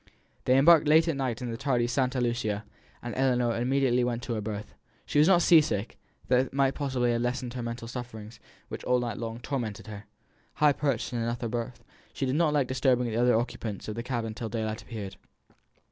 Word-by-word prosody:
They 130 +1 +4
embarked 155 +2 +6
late 160 +2 +6
that 165 - +1
evening 135 -5 -2
in 120 -1 -3
the 115 - -4
tardy 130 -3 +1
Santa 130 +1 0
Lucia, 115 -4 -1 0.4
and 120 -1 -4
Ellinor 125 -3 +1
immediately 125 0 +2
went 120 0 -2
to 120 - -3
her 110 - -2
berth. 105 0 -6 0.3
She 145 - +1
was 150 - +6
not 175 -3 +5
sea 165 -2 +7
sick; 115 -8 -3 0.3
that 130 +1 +2
might 135 0 +2
possibly 130 -4 0
have 120 0 0
lessened 125 0 -2
her 125 - -4
mental 115 0 -5
sufferings, 115 -2 -8 0.3
which - - -7
all 125 - +2
night 120 -3 -3
long 115 0 -5
tormented 115 -6 -4
her. 105 -2 -9 0.5
High 150 -1 +4
perched 135 -5 -1
in 120 - -1
an 115 0 -1
upper 120 0 -3
berth, 120 +1 -4 0.3
she 135 - -2
did 130 - 0
not 160 -1 +3
like 145 -3 +2
disturbing 130 -1 +2
the - - -3
other 120 0 +4
occupants 115 -3 -4
of 110 - -3
the 115 - -4
cabin 120 -3 -3
till 115 0 -5
daylight 110 0 -3
appeared. 105 -5 -7
120 Hz, 210 wpm, -28 LUFS, 115-135 Hz, 0.5 s, sea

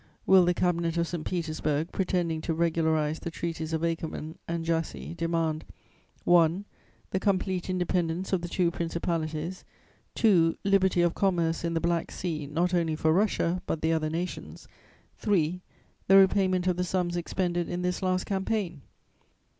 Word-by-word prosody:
"Will 190 -2 +6
the 175 0 +2
Cabinet 170 -2 0
of 170 0 +1
St. 170 -2 -4
Petersburg, 155 -3 -2
pretending 175 -4 -1
to 165 - -2
regularize 160 -2 +1
the - - -5
Treaties 165 -1 -4
of 160 0 -1
Akerman 160 -1 -4
and 165 -1 -3
Jassy 150 - -2
demand 165 - -1 0.6
(1) 175 +2 +4 0.5
the 190 - 0
complete 190 -2 0
independence 180 0 -1
of 185 - +2
the 175 - -4
two 175 -1 +1
principalities; 165 0 -3 0.5
(2) 170 -7 +4
liberty 190 -3 +3
of 175 -1 +2
commerce 170 -5 +1
in 170 0 -1
the - - +2
Black 170 0 0
Sea, 155 -5 -4
not 170 +5 0
only 165 -3 +1
for 160 0 +2
Russia, 185 -2 +1
but 160 - -2
the 160 0 +3
other 155 -1 0
nations; 170 +3 -5 0.5
(3) 180 -4 +1 0.5
the 195 - +7
repayment 190 -2 +4
of 180 -1 +1
the 180 - +1
sums 180 -1 -1
expended 175 0 -1
in 180 +1 -3
this 180 +2 -1
last 185 -1 0
campaign? 190 -5 -2
170 Hz, 155 wpm, -28 LUFS, 160-185 Hz, 0.6 s, the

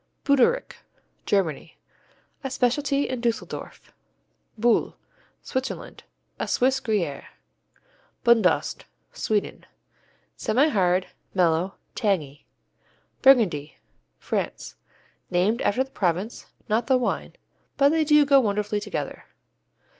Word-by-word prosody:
Buderich 280 - +2 0.5
Germany 180 -8 -1 0.7
A 270 - -2
specialty 275 +2 +1
in 255 -2 -4
Dusseldorf. 235 0 -4 0.6
Bulle 230 +1 +2 0.5
Switzerland 260 0 -5 0.3
A - - -2
Swiss 265 +1 +2
Gruyère. 200 - -2 1.0
Bundost 235 -2 +2 0.3
Sweden 210 -2 -2 0.7
Semihard; 195 - +2 0.3
mellow; 175 +1 +2 0.2
tangy. 165 - -2 0.7
Burgundy 200 - +4 0.4
France - - -4 0.6
Named 190 +6 +1
after 250 +6 +2
the 265 - -17
province, 190 +3 -2 0.2
not 225 +2 0
the 260 -2 +4
wine, 250 - -2 0.4
but 280 0 +5
they 320 +1 +2
go 295 -2 +5
wonderfully 210 -2 0
together. 205 - -5
230 Hz, 90 wpm, -25 LUFS, 190-265 Hz, 1.0 s, but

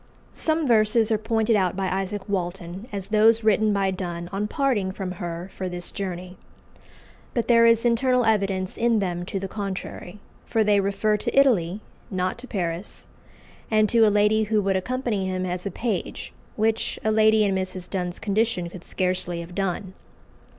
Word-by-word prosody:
Some 315 0 0
verses 225 -2 +3
are 215 - +2
pointed 225 +1 +1
out 185 -4 +1
by 195 0 -1
Isaac 195 +2 -3
Walton 185 +1 -4
as 200 -1 -4
those 220 +1 +4
written 215 0 +3
by 195 -1 +1
Donne 175 -2 -5
on 205 +2 -2
parting 220 -7 0
from 190 -1 -5
her 175 +2 -5
for 185 -1 -4
this 175 0 -5
journey. 185 -2 -5 1.0
But 235 - 0
there 230 -1 +6
is 230 0 +4
internal 250 +1 +3
evidence 195 -3 0
in 235 -1 +3
them 175 -3 -2
to 195 - -3
the 195 - -4
contrary; 195 -1 -6 0.3
for 225 -2 +2
they 205 -1 +3
refer 200 +2 +1
to 240 - +1
Italy, 210 -8 +3 0.3
not 185 +2 -2
to 255 - -9
Paris, 175 -3 -4 0.6
and 215 -1 +4
to 235 - +3
a - - +5
lady 210 +1 +3
who 215 0 +1
would 195 0 +1
accompany 220 -1 -1
him 185 0 -2
as 180 +1 -3
a - - -1
page, 215 +1 -4 0.2
which 220 +1 0
a 220 - +2
lady 220 0 +4
in 200 -2 +1
Mrs. 185 -1 -3
Donne's 180 -2 -3
condition 200 -4 0
could 175 -1 -10
scarcely 180 -2 -2
have 170 +1 -10
done. 190 0 -2
200 Hz, 175 wpm, -24 LUFS, 185-220 Hz, 1.0 s, there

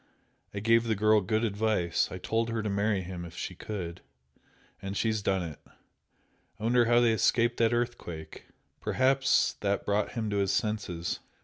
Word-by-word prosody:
I 100 - -4
gave 115 +2 +4
the 110 -1 +1
girl 105 +1 +4
good 110 +4 0
advice 105 -5 +1
I 90 - -5
told 115 +5 -1
her 115 -1 -2
to 105 - -2
marry 100 0 +1
him 90 -1 -6
if 85 0 -10
she - - -4
could, 90 -6 -6 0.8
and 95 0 -4
she's 110 -2 0
done 95 -2 0
it! 80 -4 -7 1.0
I - - -9
wonder 120 +1 +4
how 120 +1 +4
they 120 -2 +4
escaped 120 +2 +2
that 115 0 +3
earthquake? 120 -10 -4 0.3
Perhaps 135 +1 +2
that 100 -1 0
brought 105 +1 0
him 110 -3 -2
to 100 - 0
his 100 -1 +1
senses! 95 -6 -2
105 Hz, 175 wpm, -29 LUFS, 95-115 Hz, 1.0 s, gave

